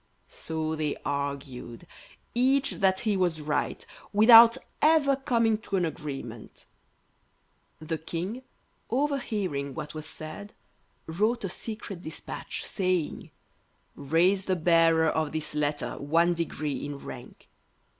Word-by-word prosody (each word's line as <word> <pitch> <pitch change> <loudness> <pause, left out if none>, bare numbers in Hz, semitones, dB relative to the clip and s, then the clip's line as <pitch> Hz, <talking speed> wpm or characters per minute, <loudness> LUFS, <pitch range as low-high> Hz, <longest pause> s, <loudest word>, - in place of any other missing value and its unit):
So 160 -1 -3
they 155 -2 -1
argued, 140 -4 -4 0.5
each 265 +3 +2
that 190 -2 +2
he 215 -3 +1
was 175 -4 +1
right, 150 0 -2 0.3
without 230 +3 +8 0.2
ever 300 -3 +5
coming 230 -5 +1
to 215 -2 -4
an 180 -2 +2
agreement. 135 -7 -7 1.1
The 155 +1 -4
King, 180 +9 -4 0.5
overhearing 215 - -1
what 150 - -6
was 155 0 -6
said, 160 +6 -8 0.5
wrote 210 +9 0
a 195 - -2
secret 210 -2 -7
despatch, 160 -2 -6
saying, 185 -5 -1 0.6
"Raise 175 +7 +2
the 185 - +1
Bearer 165 -1 +4
of 155 -1 -1
this 155 -1 -3
letter 150 0 -2
one 165 +4 +2
degree 155 -3 -3
in 145 -1 -5
rank." - - -10
165 Hz, 115 wpm, -28 LUFS, 150-215 Hz, 1.1 s, without